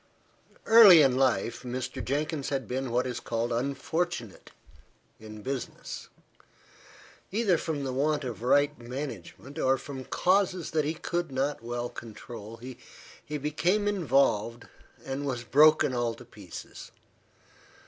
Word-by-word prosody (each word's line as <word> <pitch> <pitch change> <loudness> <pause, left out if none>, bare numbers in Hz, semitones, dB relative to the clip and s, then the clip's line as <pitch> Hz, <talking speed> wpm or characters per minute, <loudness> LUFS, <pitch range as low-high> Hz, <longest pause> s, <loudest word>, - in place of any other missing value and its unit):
EARLY 205 -8 +9
in 130 -2 +3
life, 130 -3 +1
Mr. 125 0 -4
Jenkins 145 +1 -2
had 135 -5 -2
been 130 +2 -3
what 120 +2 +1
is 125 -2 -3
called 115 +1 -2
unfortunate 140 - -3 0.7
in 110 -1 -10
business. 135 -2 -5 1.2
Either 205 -3 +2
from 155 -3 -3
the 130 -1 -3
want 145 +2 +1
of 120 -4 -5
right 145 +4 +2
management, 125 - -7
or 130 0 +3
from 135 0 -8
causes 185 -2 +1
that 155 -2 +1
he 155 +2 -1
could 175 -1 -3
not 135 +1 -1
well 120 +1 -3
control, 115 -1 -9
he 125 +1 -9 0.6
became 170 +8 0
involved, 135 - +1 0.4
and 135 +1 -3
was 130 -4 -3
broken 150 +2 +5
all 120 -2 -1
to 125 - -13
pieces. 105 -7 -10
135 Hz, 130 wpm, -28 LUFS, 120-155 Hz, 1.2 s, EARLY